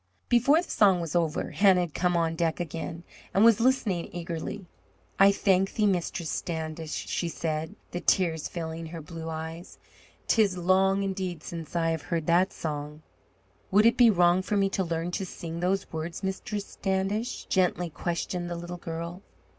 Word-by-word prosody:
Before 275 +8 +4
the - - -10
song 195 -4 +4
was 165 -1 -4
over, 165 -3 0
Hannah 190 -3 +5
had 170 -4 -3
come 180 -1 +1
on 165 -1 +1
deck 165 0 0
again, 165 0 -5 0.3
and 200 +3 +6
was 230 -2 +6
listening 230 -8 +1
eagerly. 175 +3 -5 0.5
"I 195 0 +8
thank 195 -1 +2
thee, 215 - +2
Mistress 175 -4 0
Standish," 160 -2 -4
she 170 - -2
said, 160 -1 -3 0.2
the 175 - -3
tears 165 -5 +2
filling 165 -1 -5
her 165 +1 -7
blue 165 +1 -7
eyes. 160 +2 -6 0.5
"'Tis 205 -5 +3
long, 190 +2 +3
indeed, 185 -4 -3
since 165 -2 -7
I 165 -1 +2
have 160 -2 -2
heard 165 -1 -2
that 175 +3 +3
song." 150 0 -5 0.7
"Would 205 +3 +5
it 230 - +6
be 240 -2 +7
wrong 175 -2 +4
for 205 +2 -1
me 195 -1 +3
to 195 - 0
learn 165 0 -2
to 195 - -2
sing 170 -2 -6
those 185 +2 -1
words, 165 +4 -5
Mistress 200 +2 -3
Standish?" 195 +5 -2
gently 180 -2 +1
questioned 175 +2 -3
the 175 - -3
little 175 +1 -6
girl. 170 +2 -6
175 Hz, 170 wpm, -28 LUFS, 165-195 Hz, 0.7 s, I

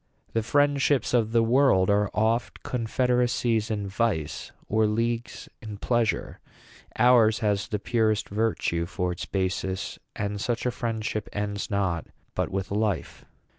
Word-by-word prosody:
'The 115 - +2
friendships 145 +2 +2
of 115 -3 +2
the 115 0 +4
world 115 -6 +4
are 105 0 +2
oft 110 +3 0
Confed'racies 120 -2 +1
in 105 -2 -2
vice, 95 -7 -2 0.2
or 110 0 +2
leagues 115 +2 -2
in 105 -2 -7
pleasure: 120 +1 0 0.6
Ours 115 -2 +5
has 105 -1 +1
the 105 - -1
purest 110 0 +1
virtue 100 -5 0
for 90 0 -2
its 85 - -5
basis; 95 0 -2 0.2
And 100 0 -3
such 120 +2 -1
a 125 - +2
friendship 110 -3 -3
ends 100 -1 -3
not 95 -5 -1 0.3
but - - -1
with 95 0 -3
life.' 105 -3 -2
110 Hz, 135 wpm, -26 LUFS, 100-120 Hz, 0.6 s, Ours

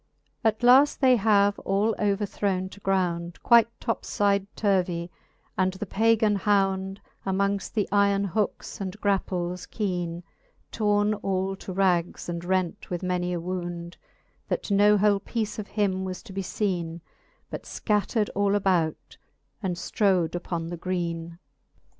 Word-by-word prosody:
At 220 +1 +1
laft 265 +4 +6
they 260 -2 +5
have 205 -1 +3
all 205 +3 +1
overthrowne 200 -2 0
to 200 - -13
ground 175 -3 -1
Quite 235 -2 +6
toplide 200 -3 0
turvey, 180 -4 0 0.5
and 185 0 +2
the 190 +2 -5
pagan 220 +1 +2
hound 195 -1 +1 0.2
Amongft 200 +1 -1
the 210 -3 0
yron 200 0 +3
hookes 210 +1 -2
and 190 +1 -5
graples 180 -3 -1
keene, 175 -5 -3 0.5
Torn 210 -1 +2
all 195 -2 -1
to 190 - -8
rags, 180 -2 +1
and 170 -1 -4
rent 185 -1 -1
with 175 0 -3
many 180 -1 -1
a 175 - -1
wound, 175 -1 -5 0.5
That - - -3
no 205 +1 +5
whole 205 0 +3
peece 220 +1 -3
of 210 - -5
him 195 -3 0
was 185 -1 -5
to 215 -4 -11
be 195 - -2
feene, 175 -4 -2 0.5
But - - -6
fcattred 210 +1 0
all 200 0 +2
about, 180 -5 0 0.4
and 185 -4 -1
ftrowM 185 -2 +1
upon 170 -2 -3
the 175 - -5
greene. 170 -2 -3
195 Hz, 140 wpm, -26 LUFS, 180-205 Hz, 0.5 s, laft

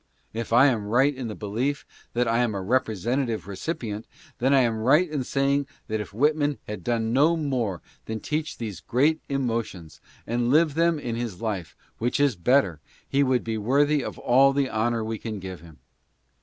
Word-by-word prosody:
If 115 0 -4
I 120 +4 +7
am 115 -7 +2
right 130 +6 +3
in 130 -3 -5
the 105 - -5
belief 120 +8 -2 0.3
that 120 0 +1
I 115 +1 +2
am 120 -4 +1
a 100 - -2
representative 115 +2 0
recipient, 105 - -4 0.3
then 130 +2 +2
I 135 -1 +6
am 115 -3 +1
right 150 +10 +4
in 150 -4 -2
saying 140 +2 +1 0.2
that 110 0 -2
if 105 - -8
Whitman 145 +5 +1
had 105 0 -6
done 115 -1 0
no 155 +6 +4
more 125 - -2 0.2
than 110 0 -4
teach 155 +6 -3
these 105 -7 -5
great 150 - +1
emotions 115 - -3
— - - -28
and 120 +1 0
live 155 +2 +4
them 165 +1 +2
in 120 -6 -4
his 115 -4 -3
GARLAND. - - -18
4 115 - -4
1 105 - 0
life, 85 - -15 0.2
which 120 +4 0
is 140 -5 +3
better 95 - +2 0.2
— - - -31
he 140 - +3
would 130 -3 +2
be 110 -1 -2
worthy 140 +6 +2
of - - -6
all 135 +3 +4
the 140 -1 +1
honor 115 +1 0
we 110 0 -4
can 110 -2 -5
give 95 -2 -7
him. 80 -2 -15
120 Hz, 210 wpm, -25 LUFS, 110-140 Hz, 0.3 s, I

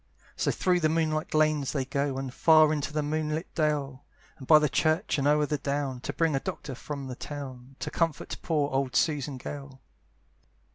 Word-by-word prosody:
So - - 0
through 180 -1 +2
the 155 -2 +2
moonlight 155 -1 0
lanes 155 -3 +2
they 135 -3 -1
go, 140 0 -1
And 135 -2 -4
far 155 0 +5
into 150 0 -2
the 150 0 -1
moonlight 155 +2 -2
dale, 145 -4 -1 0.4
And 130 - -10
by 155 - +9
the 150 0 +3
church, 155 +4 +1
and 140 - +1
o'er 150 0 +4
the 150 0 -2
down, 140 -2 -2
To - - -4
bring 165 -3 +1
a - - +2
doctor 135 0 -5
from 140 +2 -6
the 130 -1 -6
town, 135 -2 -8
To - - -3
comfort 165 -3 -1
poor 150 -3 0
old 135 -2 -1
Susan 145 -2 +1
Gale. 135 0 -8
145 Hz, 190 wpm, -28 LUFS, 135-155 Hz, 0.4 s, by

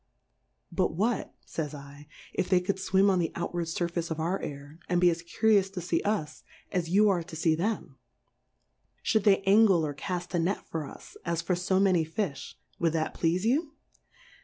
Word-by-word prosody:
But 180 -2 0
what, 220 +5 -1
fays 150 -2 -4 0.3
/, 145 - -20
if - - -1
they 185 - +5
cou'd 190 +2 -1
Iwim 190 +1 +3
on 185 - +2
the 165 -2 0
out 170 +1 -3
ward 170 -1 -2
Surface 170 0 -2
of 160 -1 -3
our 175 +4 -1
Air, 145 +2 -8
and 175 -1 +2
be 175 0 +5
as 165 0 -4
cu 170 +6 -6
rious 200 -3 +5
to 185 - -4
fee 170 -1 0
us, 175 -8 -2 0.3
as 180 -4 -1
you 205 +4 +5
are 185 -3 +2
to 165 -1 -9
fee 160 0 +2
them; 170 - -2 1.1
fhould 220 -1 +2
they 195 -1 +5
Angle 195 -4 +5
or 145 - -3
caft 175 +4 -4
a 175 - +2
Net 180 +5 -1
for 155 -3 -4
us, - - -12
as 170 -1 -1
for 180 +1 +1
fo 185 +2 +1
many 185 -4 +4
Fifh, 160 -4 -4 0.2
would 165 -2 +1
that 160 -1 -1
pleafe 175 +3 0
you 290 +6 +1
175 Hz, 200 wpm, -28 LUFS, 165-195 Hz, 1.1 s, they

